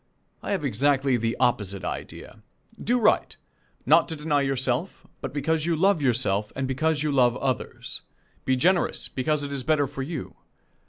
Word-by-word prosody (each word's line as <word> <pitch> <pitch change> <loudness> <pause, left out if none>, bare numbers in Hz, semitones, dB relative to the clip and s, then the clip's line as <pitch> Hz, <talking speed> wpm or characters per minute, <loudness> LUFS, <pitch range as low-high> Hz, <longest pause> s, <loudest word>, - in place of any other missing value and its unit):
I - - -6
have 195 -7 -1
exactly 135 +2 +2
the 115 0 -1
opposite 105 -6 0
idea. - - -7 0.4
Do 245 +2 +2
right, 225 - +2 0.5
not - - +5
to 160 - -3
deny 150 -1 0
yourself, 135 +4 -1 0.2
but - - -4
because 160 +2 -1
you 170 - +2
love 190 0 +3
yourself 110 -6 0
and 135 0 -2
because 150 +3 0
you 150 - 0
love 125 -3 +3
others. 130 -3 -3 0.4
Be 130 - +2
generous, 175 +7 +1
because 145 +3 -1
it 140 - -4
is 140 -2 -2
better 145 +2 +2
for 135 0 -6
you. 145 0 -6
140 Hz, 165 wpm, -25 LUFS, 125-155 Hz, 0.5 s, not